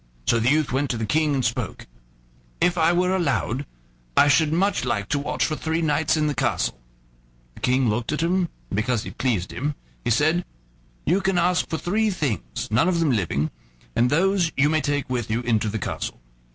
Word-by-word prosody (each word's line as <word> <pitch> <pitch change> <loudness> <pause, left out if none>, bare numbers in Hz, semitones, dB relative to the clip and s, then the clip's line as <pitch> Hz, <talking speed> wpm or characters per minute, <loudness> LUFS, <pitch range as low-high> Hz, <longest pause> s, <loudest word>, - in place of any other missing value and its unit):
So 115 - +3
the 115 +2 +2
youth 150 0 +2
went 135 +2 0
to 120 - -1
the 110 - -2
King 150 +6 +1
and 130 -3 0
spoke: 115 -3 -3 0.7
"If 180 0 +3
I 165 -1 +3
were 180 +2 +2
allowed, 140 -5 -1 0.5
I 145 - +6
should 150 +1 +4
much 190 +2 +1
like 105 -5 -1
to 145 - +1
watch 140 - -1
for 155 - -1
three 160 +2 -1
nights 155 0 +2
in 155 - +1
the 150 - +1
castle." 60 - -1 0.7
The - - -14
King 130 0 +2
looked 110 +4 -1
at 150 - -1
him, 175 0 +1 0.2
and - - -1
because 110 +1 0
he - - -7
pleased 110 -9 -1
him, 145 +3 -2 0.3
he 120 - -1
said: 155 +9 +2 0.6
"You 185 +5 +2
can 190 -1 +1
ask 180 +1 +2
for 160 - -1
three 215 +7 +1
things, 115 - -3
none 110 +10 +3
of 175 -2 +1
them 160 -4 +2
living, 80 - 0 0.4
and 120 +1 +3
those 180 +2 +2
you 140 +2 +4
may 155 0 +2
take 145 -2 -1
with 120 -4 -2
you 115 +2 0
into 110 -3 +1
the 110 - -2
castle." 95 - -4
145 Hz, 205 wpm, -24 LUFS, 120-165 Hz, 0.7 s, I